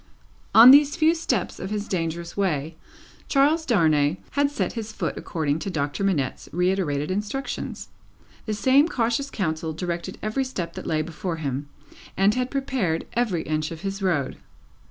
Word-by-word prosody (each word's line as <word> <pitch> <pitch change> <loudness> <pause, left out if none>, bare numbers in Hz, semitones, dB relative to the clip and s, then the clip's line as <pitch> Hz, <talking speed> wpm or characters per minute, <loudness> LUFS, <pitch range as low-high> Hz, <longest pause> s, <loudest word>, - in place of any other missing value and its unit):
On 230 +3 +11
these 290 +1 +6
few 325 -1 +4
steps 255 - -2
of 190 - -5
his 210 0 -3
dangerous 170 -1 -3
way, 160 -5 -1 0.5
Charles 300 +4 +3
Darnay 155 - +3
had 285 +1 +2
set 290 - -2
his 225 -2 -5
foot - - -3
according 155 -2 -2
to 195 - -4
Doctor 145 +1 -2
Manette's 160 -10 -1
reiterated 180 -4 0
instructions. 210 +8 -4 0.6
The 215 - -1
same 265 +7 +4
cautious 240 -1 -1
counsel 160 -6 -2
directed 175 +2 -4
every 215 +6 0
step 195 -10 -5
that - - -7
lay 155 -1 +1
before 165 +2 -4
him, 145 -2 -4 0.5
and 195 +2 +4
had 250 +1 -1
prepared 255 -12 -1
every 215 -9 0
inch 155 0 -2
of 165 -1 -8
his 195 +1 -4
road. 165 -9 0
190 Hz, 155 wpm, -24 LUFS, 160-245 Hz, 0.6 s, On